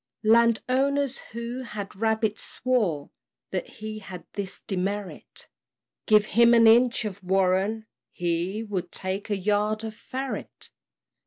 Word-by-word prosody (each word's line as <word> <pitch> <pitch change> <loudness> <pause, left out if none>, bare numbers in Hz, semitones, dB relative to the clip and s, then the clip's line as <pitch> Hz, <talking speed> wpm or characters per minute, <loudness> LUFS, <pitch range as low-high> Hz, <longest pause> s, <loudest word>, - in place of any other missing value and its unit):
Land 230 +1 +5
owners, 275 +1 +1
who 235 +2 -5
had 210 -6 -7
rabbits, 220 0 0
swore 205 - -1 0.4
That 185 - -2
he 215 0 -7
had 190 -3 -9
this 200 -2 -3
demerit 195 +1 -4 0.6
Give 215 -1 +6
him 235 +2 +5
an 230 -1 +6
inch 235 +1 +5
of 200 -1 -6
warren, 190 +4 +1 0.3
he 175 +5 -1
Would 185 -5 -4
take 190 +3 -3
a 205 - 0
yard 210 +2 0
of 220 -1 -5
ferret. 260 +4 -6
215 Hz, 130 wpm, -26 LUFS, 195-235 Hz, 0.6 s, Give